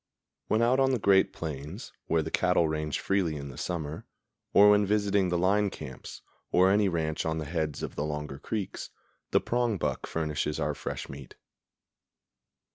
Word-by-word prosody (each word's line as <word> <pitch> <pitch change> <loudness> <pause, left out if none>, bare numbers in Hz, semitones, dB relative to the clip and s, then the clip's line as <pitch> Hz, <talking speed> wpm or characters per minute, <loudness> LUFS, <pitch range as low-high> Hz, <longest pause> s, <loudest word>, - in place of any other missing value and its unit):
When 110 +2 +2
out 125 +3 +3
on 135 0 +4
the 130 - +2
great 100 -3 +4
plains, 75 - -6
where 80 -1 +2
the 80 - -6
cattle 90 -3 +3
range 75 -1 -2
freely 95 -5 0
in 70 -1 -6
the 70 - -10
summer, 80 -3 -4 0.4
or 105 +1 +7
when 105 0 +5
visiting 100 -2 +2
the 90 - +1
line 100 +3 +2
camps, 65 -7 -9 0.3
or 95 +1 +5
any 100 0 +3
ranch 80 -3 -1
on 80 0 -1
the 80 - -3
heads 80 -1 -2
of - - -4
the 75 - -2
longer 75 -2 -4
creeks, 105 +4 -4 0.4
the - - +4
prongbuck 120 -4 -1
furnishes 75 -1 -2
our - - 0
fresh - - -5
meat. 70 -1 -10
85 Hz, 170 wpm, -29 LUFS, 75-100 Hz, 0.4 s, or